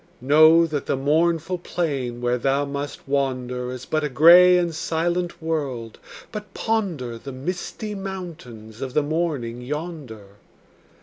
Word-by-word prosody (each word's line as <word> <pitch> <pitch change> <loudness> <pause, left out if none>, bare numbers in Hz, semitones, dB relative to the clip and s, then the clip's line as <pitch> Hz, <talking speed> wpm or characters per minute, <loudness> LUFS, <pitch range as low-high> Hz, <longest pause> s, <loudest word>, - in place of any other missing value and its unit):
Know 155 +5 +6
that 150 -4 -4
the - - 0
mournful 165 +5 +1
plain 135 -9 -3
where 125 0 0
thou 135 +3 +1
must 140 0 -6
wander 125 -3 -1
Is 130 0 -7
but 155 -1 -1
a 150 - -1
gray 175 +6 +7
and 175 -2 0
silent 170 +2 -2
world, 135 -8 -3 0.3
but 210 -3 -8
ponder 170 - -2
The 135 - -8
misty 180 +9 -5
mountains 165 - -8
of 130 -2 -5
the 150 - +3
morning 145 -7 -2
yonder. 130 - -7
150 Hz, 135 wpm, -23 LUFS, 125-170 Hz, 0.3 s, gray